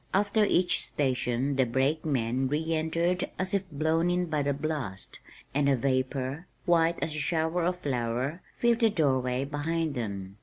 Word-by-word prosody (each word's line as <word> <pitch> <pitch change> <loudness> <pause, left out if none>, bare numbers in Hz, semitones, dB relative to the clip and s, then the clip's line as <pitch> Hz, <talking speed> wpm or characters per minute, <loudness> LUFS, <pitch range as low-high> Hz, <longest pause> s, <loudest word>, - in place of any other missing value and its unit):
After 205 +2 +3
each 180 -2 +2
station 130 0 0
the 130 - +4
brakemen 130 -1 0
re 160 +4 -1
entered 170 +3 0
as 185 +1 -2
if 195 -2 0
blown 160 +3 +1
in 180 0 +1
by 155 -3 -1
the 140 0 +1
blast, 140 -9 -4 0.3
and 140 +1 +2
a 135 - +4
vapor, 130 +4 -1 0.2
white 170 -1 +3
as 155 - -2
a 155 - -3
shower 160 +3 0
of 180 +1 0
flour, 130 +4 -2 0.2
filled 235 -1 +3
the 225 -2 +5
door 145 -10 +2
way, 125 +1 -1
behind 155 +2 -1
them. 100 -5 -5
150 Hz, 165 wpm, -28 LUFS, 130-170 Hz, 0.3 s, the